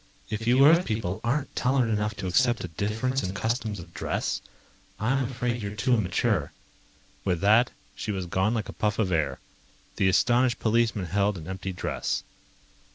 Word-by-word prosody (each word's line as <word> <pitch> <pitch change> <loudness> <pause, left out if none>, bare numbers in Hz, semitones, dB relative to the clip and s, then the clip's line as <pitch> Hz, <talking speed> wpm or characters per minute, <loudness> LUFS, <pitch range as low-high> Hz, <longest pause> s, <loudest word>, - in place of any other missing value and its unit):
If 110 +1 -3
you 130 +3 +6
Earth 165 +4 +6
people 110 - -2
aren't 130 +4 -1
tolerant 125 -2 +2
enough 105 0 -1
to - - -6
accept 120 +6 +2
a - - -3
difference 110 - -1
in 95 0 -4
customs 110 -2 -2
of 85 0 -11
dress, - - -2 0.6
I'm 130 +5 +1
afraid 120 -1 -2
you're 100 0 -5
too 105 +5 +1
immature." 100 -7 +1 0.7
With 90 -3 0
that, 110 +5 +5 0.3
she 110 - -3
was 95 -3 -3
gone 95 +6 +1
like 110 - -2
a - - -7
puff 105 -1 -1
of 100 -5 +1
air. 80 -3 0 0.6
The 95 - +3
astonished 120 +5 +3
policemen 110 -3 +1
held 100 +3 +1
an 80 -1 -9
empty 95 0 -4
dress. 90 - -2
110 Hz, 170 wpm, -27 LUFS, 95-120 Hz, 0.7 s, you